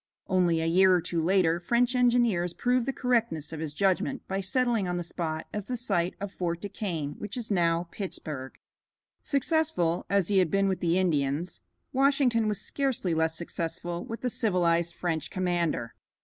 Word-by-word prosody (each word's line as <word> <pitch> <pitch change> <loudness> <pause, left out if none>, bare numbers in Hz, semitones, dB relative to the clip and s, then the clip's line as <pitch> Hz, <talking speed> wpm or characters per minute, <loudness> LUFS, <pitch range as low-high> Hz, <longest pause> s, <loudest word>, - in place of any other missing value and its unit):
Only 175 -3 +2
a - - -1
year 185 +3 +5
or - - +3
two 170 0 -2
later 170 -1 +3
French 240 +7 +2
engineers 240 -8 +2
proved 250 0 +1
the - - +2
correctness 230 - 0
of 160 - -5
his 155 -2 -3
judgment 195 - 0
by 195 +1 -2
settling 230 0 +1
on 175 0 -1
the 175 - -2
spot 160 -2 -4
as 210 -2 -3
the 250 +2 -3
site 185 -7 0
of 200 -1 -5
Fort 170 -3 -2
Du 205 - -5
Quesne, 165 -9 -3
which 210 +3 -5
is 230 -3 -3
now 170 -2 +2
Pittsburg. 150 -9 -6 0.6
Successful 280 - 0
as 200 -2 +2
he 200 -2 +4
had 180 -3 +3
been 195 +3 +2
with 190 -1 0
the 170 0 +1
Indians, 160 -1 0 0.3
Washington 265 -4 +3
was 210 -2 -1
scarcely 265 - -1
less 160 0 0
successful 170 0 -4
with 230 - -7
the 250 - -1
civilized 170 -6 +1
French 165 -4 -2
commander. 175 -9 -1
185 Hz, 175 wpm, -28 LUFS, 170-225 Hz, 0.6 s, year